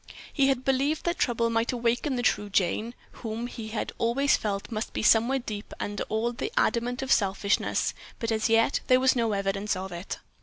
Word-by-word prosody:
He 275 Hz, -3 st, +3 dB
had 265 Hz, -2 st, 0 dB
believed 275 Hz, +3 st, +1 dB
that 345 Hz, 0 st, -1 dB
trouble 230 Hz, -1 st, +1 dB
might 230 Hz, +1 st, +1 dB
awaken 245 Hz, +3 st, 0 dB
the 245 Hz, -, -2 dB
true 210 Hz, -3 st, +1 dB
Jane, 210 Hz, +5 st, 0 dB, 0.3 s
whom 225 Hz, 0 st, -4 dB
he 230 Hz, -2 st, -7 dB
had 220 Hz, 0 st, -3 dB
always 265 Hz, +4 st, +3 dB
felt 200 Hz, +1 st, -3 dB
must 215 Hz, -1 st, -3 dB
be -, -, -2 dB
somewhere 230 Hz, +5 st, +4 dB
deep 215 Hz, -5 st, -6 dB
under 205 Hz, 0 st, -3 dB
all 225 Hz, +2 st, 0 dB
the 415 Hz, -, -4 dB
adamant 245 Hz, +2 st, +1 dB
of 265 Hz, -, -3 dB
selfishness, 200 Hz, 0 st, +1 dB, 0.2 s
but 230 Hz, -2 st, -2 dB
as 220 Hz, 0 st, +1 dB
yet 225 Hz, +3 st, +3 dB
there 255 Hz, 0 st, +5 dB
was 260 Hz, 0 st, +4 dB
no 230 Hz, -3 st, +1 dB
evidence 195 Hz, +1 st, -1 dB
of 190 Hz, +1 st, -5 dB
it. 175 Hz, +2 st, -5 dB
230 Hz, 195 wpm, -27 LUFS, 210-255 Hz, 0.3 s, there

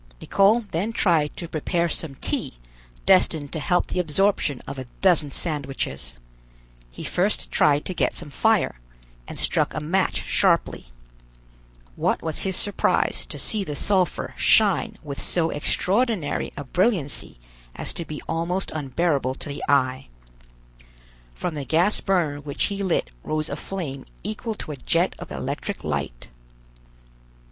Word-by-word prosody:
Nicholl 200 Hz, -, +4 dB
then 190 Hz, +8 st, -1 dB
tried 165 Hz, -9 st, +2 dB
to 170 Hz, -, -5 dB
prepare 170 Hz, +2 st, 0 dB
some 160 Hz, -3 st, -3 dB
tea -, -, -2 dB, 0.5 s
destined 165 Hz, -6 st, +4 dB
to 160 Hz, -, -1 dB
help 175 Hz, +3 st, +2 dB
the -, -, -3 dB
absorption 165 Hz, -4 st, +1 dB
of 140 Hz, -1 st, -6 dB
a 130 Hz, -, -6 dB, 0.2 s
dozen 170 Hz, -6 st, +5 dB
sandwiches. 135 Hz, -, -3 dB, 0.7 s
He -, -, -9 dB
first 195 Hz, +4 st, 0 dB
tried 145 Hz, -1 st, +3 dB
to 185 Hz, -, -2 dB
get -, -, 0 dB
some 150 Hz, -4 st, -7 dB
fire, 220 Hz, -, +2 dB, 0.5 s
and -, -, -7 dB
struck -, -, +1 dB
a -, -, 0 dB
match 175 Hz, +6 st, 0 dB
sharply. 170 Hz, -, +2 dB, 1.1 s
What -, -, 0 dB
was 160 Hz, -2 st, -2 dB
his 190 Hz, -1 st, 0 dB
surprise 205 Hz, -, +2 dB
to -, -, -6 dB
see 215 Hz, -3 st, 0 dB
the 150 Hz, -6 st, -5 dB
sulphur 185 Hz, +2 st, +1 dB
shine 215 Hz, +1 st, +4 dB
with 140 Hz, -2 st, -5 dB
so 165 Hz, -2 st, +3 dB
extraordinary 195 Hz, -, 0 dB
a 145 Hz, -, -4 dB
brilliancy 170 Hz, -, 0 dB, 0.4 s
as -, -, -2 dB
to 170 Hz, -, -4 dB
be 155 Hz, -2 st, -7 dB
almost 170 Hz, +3 st, -1 dB
unbearable 140 Hz, -2 st, 0 dB
to 145 Hz, -, -7 dB
the 140 Hz, -, -5 dB
eye. 130 Hz, -2 st, +2 dB, 1.3 s
From 175 Hz, -, -3 dB
the 145 Hz, -2 st, -4 dB
gas 170 Hz, +9 st, +2 dB
burner 170 Hz, -7 st, +1 dB
which 145 Hz, -1 st, -3 dB
he 200 Hz, -1 st, -1 dB
lit 170 Hz, -, 0 dB
rose 155 Hz, 0 st, -2 dB
a 145 Hz, -, -2 dB
flame 150 Hz, -6 st, -5 dB, 0.2 s
equal 215 Hz, +2 st, -3 dB
to 155 Hz, -, -6 dB
a 145 Hz, -, -6 dB
jet 170 Hz, +7 st, +1 dB
of -, -, -8 dB
electric -, -, -4 dB
light. -, -, -3 dB
165 Hz, 145 wpm, -24 LUFS, 145-190 Hz, 1.3 s, dozen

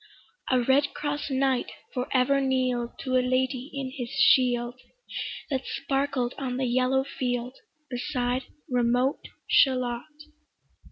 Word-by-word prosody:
A 255 Hz, -, +4 dB
redcross 290 Hz, +3 st, +1 dB
knight 265 Hz, -1 st, +1 dB, 0.3 s
for 250 Hz, 0 st, -2 dB
ever 275 Hz, +2 st, +3 dB
kneel'd 255 Hz, -3 st, 0 dB
To 255 Hz, -1 st, +1 dB
a -, -, +4 dB
lady 255 Hz, +1 st, 0 dB
in 270 Hz, -2 st, -4 dB
his 250 Hz, -3 st, -5 dB
shield, 245 Hz, -1 st, +3 dB, 0.7 s
That 265 Hz, -2 st, +1 dB
sparkled 270 Hz, -3 st, -1 dB
on 255 Hz, -2 st, -2 dB
the 260 Hz, -, 0 dB
yellow 255 Hz, +2 st, +2 dB
field, 250 Hz, -2 st, -3 dB, 0.3 s
Beside 250 Hz, 0 st, -2 dB, 0.2 s
remote 250 Hz, +2 st, +1 dB, 0.2 s
Shalott. 255 Hz, 0 st, +3 dB
255 Hz, 115 wpm, -27 LUFS, 245-270 Hz, 0.7 s, A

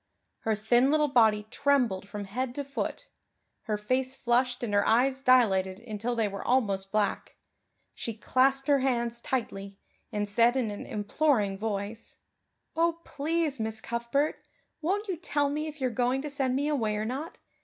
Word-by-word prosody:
Her 220 Hz, -1 st, 0 dB
thin 240 Hz, +5 st, +3 dB
little 300 Hz, 0 st, +3 dB
body 220 Hz, -5 st, +4 dB
trembled 245 Hz, -9 st, +1 dB
from 205 Hz, -1 st, -5 dB
head 245 Hz, +5 st, -3 dB
to 285 Hz, -, -2 dB
foot; 275 Hz, 0 st, -4 dB, 0.6 s
her 215 Hz, -2 st, -1 dB
face 255 Hz, +5 st, -1 dB
flushed 245 Hz, 0 st, +1 dB
and 215 Hz, -4 st, -2 dB
her 205 Hz, -, +4 dB
eyes 260 Hz, +4 st, +3 dB
dilated 195 Hz, -8 st, +3 dB
until 230 Hz, +1 st, -3 dB
they 225 Hz, -2 st, +1 dB
were 200 Hz, 0 st, -6 dB
almost 200 Hz, -6 st, +1 dB
black; 210 Hz, -2 st, -1 dB, 0.6 s
she 230 Hz, -, -5 dB
clasped 270 Hz, +4 st, +2 dB
her 285 Hz, -1 st, +4 dB
hands 235 Hz, -3 st, -1 dB
tightly 200 Hz, -6 st, -3 dB, 0.3 s
and 205 Hz, 0 st, -1 dB
said 235 Hz, +5 st, +3 dB
in 235 Hz, -5 st, 0 dB
an 205 Hz, -, -7 dB
imploring 210 Hz, -1 st, +1 dB
voice: 205 Hz, +1 st, -4 dB, 0.6 s
"Oh, 335 Hz, 0 st, +1 dB
please, 300 Hz, -1 st, -1 dB
Miss 220 Hz, 0 st, -2 dB
Cuthbert, 235 Hz, +6 st, -2 dB, 0.3 s
won't 400 Hz, +7 st, -1 dB
you 370 Hz, -3 st, -2 dB
tell 290 Hz, -3 st, 0 dB
me 305 Hz, +2 st, -2 dB
if 305 Hz, -1 st, -8 dB
you 260 Hz, -, 0 dB
are -, -, +2 dB
going 250 Hz, +3 st, 0 dB
to 300 Hz, -, -4 dB
send 265 Hz, -3 st, 0 dB
me 285 Hz, +2 st, 0 dB
away 230 Hz, -8 st, 0 dB
or 210 Hz, +1 st, -2 dB
not? 270 Hz, +8 st, -5 dB
245 Hz, 170 wpm, -28 LUFS, 210-275 Hz, 0.6 s, body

